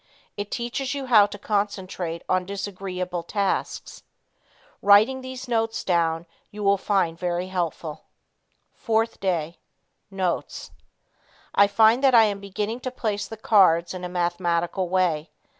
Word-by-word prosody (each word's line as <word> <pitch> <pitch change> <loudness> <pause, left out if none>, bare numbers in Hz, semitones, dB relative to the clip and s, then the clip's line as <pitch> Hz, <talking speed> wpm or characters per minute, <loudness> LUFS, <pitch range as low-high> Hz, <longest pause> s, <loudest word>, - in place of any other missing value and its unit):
It 205 0 -5
teaches 255 +4 -3
you 275 -1 -4
how 215 -5 +6
to 205 - -8
concentrate 190 -5 -3
on 185 0 +1
disagreeable 185 -2 -4
tasks. 200 +3 -3 0.8
Writing 215 +6 +5
these 260 0 -8
notes 225 -2 -1
down 165 -2 +1 0.2
you 210 0 -7
will 200 0 +3
find 180 -5 0
very 180 0 -2
helpful. 170 -4 -4 0.8
4th 225 0 0
Day. 170 -4 -2 0.5
Notes. 190 -3 -3 0.8
I 200 - +5
find 220 +5 +4
that 265 -2 +5
I 225 - +8
am 205 -2 0
beginning 205 +4 -4
to 255 - -4
place 210 -5 -3
the 225 - -8
cards 185 -6 +4
in 180 -1 -7
a 180 - -4
mathematical 175 0 -1
way. 175 -4 +1
195 Hz, 135 wpm, -24 LUFS, 175-220 Hz, 0.8 s, I